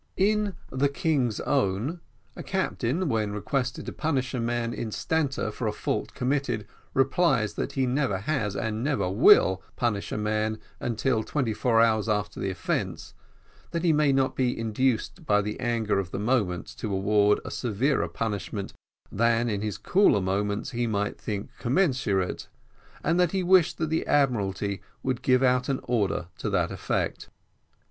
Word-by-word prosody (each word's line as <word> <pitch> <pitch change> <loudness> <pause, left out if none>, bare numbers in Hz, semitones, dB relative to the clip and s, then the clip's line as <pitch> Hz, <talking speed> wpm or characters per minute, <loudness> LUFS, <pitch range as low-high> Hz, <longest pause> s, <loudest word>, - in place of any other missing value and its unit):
In 205 0 +2 0.2
"The 135 +2 +1
King's 140 - 0
Own," 105 - 0 0.4
a - - -7
captain, 180 -3 -1
when 110 -5 0
requested 125 +4 -2
to - - -4
punish 140 -5 -1
a 125 - -1
man 120 0 -1
instanter 135 +2 -1
for 115 +1 -3
a - - +1
fault - - -3
committed, 125 -4 -1 0.3
replies 135 - +2
that - - -3
he 135 -1 +1
never 130 -5 0
has 105 -2 -1
and 110 +1 -2
never 135 -10 0
will 95 -2 +6
punish 105 -5 -1
a - - -2
man 110 +1 0 0.2
until 120 0 0
twenty 125 -5 -1
four 115 +1 +2
hours 110 -1 +2
after 105 -2 -1
the 95 - -1
offence, 90 -3 -3 0.6
that 170 0 -3
he 170 -3 +4
may 150 -1 +3
not 135 -1 +1
be 125 -2 0
induced 115 - -1
by 105 0 +4
the 105 +1 -3
anger 115 -5 0
of 95 -3 -3
the - - -5
moment 105 -5 0
to 110 - -3
award 105 +1 +3
a - - -5
severer 125 +4 0
punishment 105 -2 -4 0.4
than 115 +2 +2
in 100 -1 -2
his 105 -2 -3
cooler 190 - +4
moments 100 +5 -1
he 120 -1 -1
might 105 -2 -2
think 105 -1 -4
commensurate 125 - 0 0.6
and 170 +2 +2
that 180 -1 +3
he 190 -1 +1
wished 180 -2 +4
that 160 -1 -2
the 160 - 0
Admiralty 100 -8 +1 0.2
would 130 -2 -1
give 130 0 +3
out 125 +1 +2
an 135 - 0
order 105 -7 0
to - - -2
that - - +1
effect. - - -2
120 Hz, 165 wpm, -27 LUFS, 105-135 Hz, 0.6 s, will